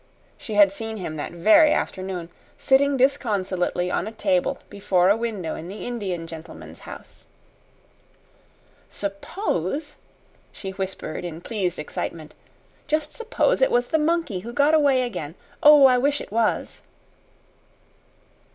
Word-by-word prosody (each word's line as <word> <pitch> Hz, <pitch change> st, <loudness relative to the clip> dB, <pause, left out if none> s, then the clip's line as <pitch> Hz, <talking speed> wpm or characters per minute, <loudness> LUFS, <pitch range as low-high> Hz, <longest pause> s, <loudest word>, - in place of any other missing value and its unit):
She 215 Hz, -, -7 dB
had 205 Hz, -2 st, +6 dB
seen 220 Hz, +1 st, -5 dB
him 175 Hz, -5 st, -5 dB
that 145 Hz, -, -5 dB
very 305 Hz, -, +5 dB
afternoon, 185 Hz, -3 st, -3 dB, 0.3 s
sitting 275 Hz, +1 st, +3 dB
disconsolately 195 Hz, -9 st, 0 dB
on -, -, -1 dB
a -, -, -5 dB
table 190 Hz, -5 st, 0 dB
before 185 Hz, -2 st, +1 dB
a 205 Hz, -, +5 dB
window 220 Hz, -8 st, -3 dB
in 165 Hz, -, -7 dB
the 200 Hz, +3 st, -7 dB
Indian 195 Hz, -8 st, -4 dB
gentleman's 165 Hz, -1 st, -10 dB
house. -, -, -12 dB, 1.6 s
"Suppose," 205 Hz, -, -3 dB, 0.5 s
she 195 Hz, -, -7 dB
whispered 190 Hz, -4 st, -5 dB
in 165 Hz, -2 st, -6 dB
pleased 185 Hz, -2 st, -3 dB
excitement 155 Hz, +1 st, -5 dB, 0.5 s
"just 305 Hz, 0 st, -1 dB
suppose 485 Hz, +2 st, 0 dB
it -, -, +5 dB
was 245 Hz, 0 st, +1 dB
the 320 Hz, -, +2 dB
monkey 315 Hz, -, 0 dB
who 225 Hz, +6 st, -8 dB
got 290 Hz, +3 st, +3 dB
away 280 Hz, -4 st, +4 dB
again. 165 Hz, -10 st, -5 dB, 0.3 s
Oh, 295 Hz, -2 st, +8 dB
I 250 Hz, -1 st, +5 dB
wish 285 Hz, +3 st, +1 dB
it -, -, -9 dB
was!" 225 Hz, 0 st, -1 dB
210 Hz, 135 wpm, -24 LUFS, 180-280 Hz, 1.6 s, Oh